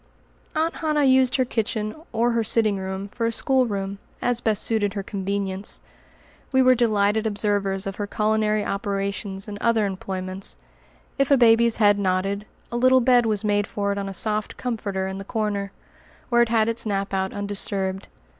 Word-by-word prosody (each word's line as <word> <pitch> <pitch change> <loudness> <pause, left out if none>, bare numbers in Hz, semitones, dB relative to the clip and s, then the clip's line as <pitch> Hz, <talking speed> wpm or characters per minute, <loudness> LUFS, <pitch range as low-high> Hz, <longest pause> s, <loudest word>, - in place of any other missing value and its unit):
Aunt 320 +2 0
Hannah 305 -2 +1
used 260 -1 +4
her 255 - +2
kitchen 215 -2 -2 0.2
or 235 +1 +1
her 230 -1 +1
sitting 215 -2 +2
room 190 +1 -4
for 230 +2 -2
a - - 0
schoolroom, 205 -6 0 0.2
as 245 -1 0
best 215 -2 +1
suited 210 -3 0
her 200 - -3
convenience. 195 0 -3 0.7
We 260 -1 +4
were 255 0 +6
delighted 220 -2 +2
observers 205 -2 -1
of 195 -1 -5
her 205 - -3
culinary 215 0 +1
operations 200 -1 -3
and 205 -1 -7
other 225 -1 +2
employments. 190 0 -3 0.6
If 275 - +2
a 280 - +6
baby's 235 -1 +5
head 205 -2 +4
nodded, 195 +2 -1 0.2
a 240 - -2
little 255 +1 +5
bed 245 -1 +4
was 215 -1 0
made 205 -1 +1
for 200 -1 -2
it 200 - -2
on 195 0 -4
a - - -6
soft 215 +2 -1
"comforter" 205 -6 -3
in 190 0 -5
the - - -6
corner, 205 -2 -2 0.6
where 240 -1 +4
it 235 - +2
had 220 -1 +2
its 230 0 0
nap 200 -2 -2
out 190 0 0
undisturbed. 200 -1 -2
210 Hz, 175 wpm, -24 LUFS, 195-230 Hz, 0.7 s, were